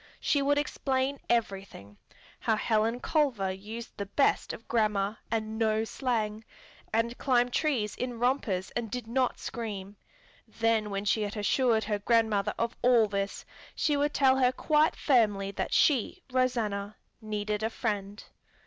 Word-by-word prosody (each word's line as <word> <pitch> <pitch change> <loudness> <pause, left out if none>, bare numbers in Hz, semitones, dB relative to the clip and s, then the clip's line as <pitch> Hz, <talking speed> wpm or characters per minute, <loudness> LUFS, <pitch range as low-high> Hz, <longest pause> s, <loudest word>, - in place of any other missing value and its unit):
She 285 - +1
would 285 +1 +2
explain 275 -2 -1
everything: 195 - -2 0.4
how 220 - +1
Helen 225 +2 +1
Culver 255 - +1
used 215 +5 -8
the 200 - -4
best 275 +8 +1
of 230 - -10
grammar, 210 -2 0
and 220 0 -2
no 220 -1 +2
slang, 220 -3 -2 0.5
and 230 +2 0
climbed 245 -2 +2
trees 245 -10 0
in 250 -1 -4
rompers 230 -7 0
and 235 -2 -3
did 250 +1 -4
not 250 +2 0
scream. 205 -4 -6 0.5
Then 225 -1 0
when 200 0 -3
she 210 +2 +2
had 210 +1 -3
assured 220 +2 +2
her 210 0 -1
grandmother 215 -2 +2
of 230 0 -1
all 245 -2 +5
this, 200 -1 -3 0.3
she 295 - +1
would 290 +1 0
tell 265 -1 +4
her 255 -1 +4
quite 305 +3 +2
firmly 205 -7 +2
that - - -3
she, 290 - +2
Rosanna, 220 -5 0 0.3
needed 210 -1 -2
a 220 - 0
friend. 205 -3 -3
225 Hz, 150 wpm, -29 LUFS, 210-250 Hz, 0.5 s, all